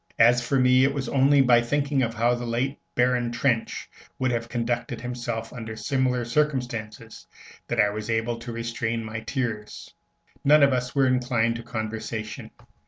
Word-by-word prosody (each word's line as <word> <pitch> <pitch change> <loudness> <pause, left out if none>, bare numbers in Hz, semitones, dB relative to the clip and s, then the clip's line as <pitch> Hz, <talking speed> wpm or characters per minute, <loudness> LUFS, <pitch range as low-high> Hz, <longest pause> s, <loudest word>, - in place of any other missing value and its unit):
As 120 +2 +5
for 135 +2 +1
me, 125 0 +5
it 140 +1 +2
was 135 -3 -3
only 140 +2 +4
by 120 -2 +5
thinking 140 +3 0
how 115 0 +1
the 120 0 -3
late 120 +4 -2 0.2
Baron 125 -1 +2
Trenck 120 -1 +1 0.5
would 130 -1 0
have 115 -1 -2
conducted 120 +1 -2
himself 120 -2 -4
under 110 -2 -6
similar 130 -1 0
circumstances 120 -5 -2 0.4
that 120 - -2
I 105 -1 +4
was 105 +1 -6
able 115 +1 -1
to 120 +1 -7
restrain 115 0 -3
my 110 0 -5
tears. 115 -3 -4 0.5
None 150 +1 +6
of 140 -1 +5
us 125 +1 -2
were 135 -1 +4
inclined 120 -2 +1
to - - -7
conversation. 110 -1 -5
120 Hz, 165 wpm, -25 LUFS, 115-130 Hz, 0.5 s, None